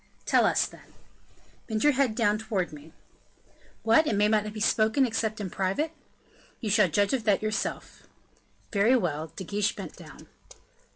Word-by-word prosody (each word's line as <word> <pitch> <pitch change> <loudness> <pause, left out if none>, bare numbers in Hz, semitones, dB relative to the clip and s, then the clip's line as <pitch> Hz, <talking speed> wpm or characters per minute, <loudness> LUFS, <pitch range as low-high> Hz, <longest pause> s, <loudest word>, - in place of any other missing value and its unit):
"Tell - - +4
us, - - +2
then." - - -14 0.7
"Bend 220 -2 -2
your 295 0 +5
head 260 -4 +1
down 215 -3 +2
towards 205 -7 -2
me." 150 +2 -12 0.9
"What! 230 +8 +4
may 205 +1 +3
it - - +2
not 215 -1 +1
be 215 - -7
spoken 220 +4 +2
except 220 -2 -2
in 195 -4 -5
private?" 195 +12 -1 0.7
"You 215 -4 -2
shall 200 -2 +4
judge 200 - +1
of 255 -4 0
that 210 -1 +2
yourself." 215 0 -4 0.7
"Very 215 +5 +4
well." 160 - -2
De 190 - -6
Guiche 205 +2 -1
bent - - -8
down. - - -13
215 Hz, 165 wpm, -27 LUFS, 200-225 Hz, 0.9 s, your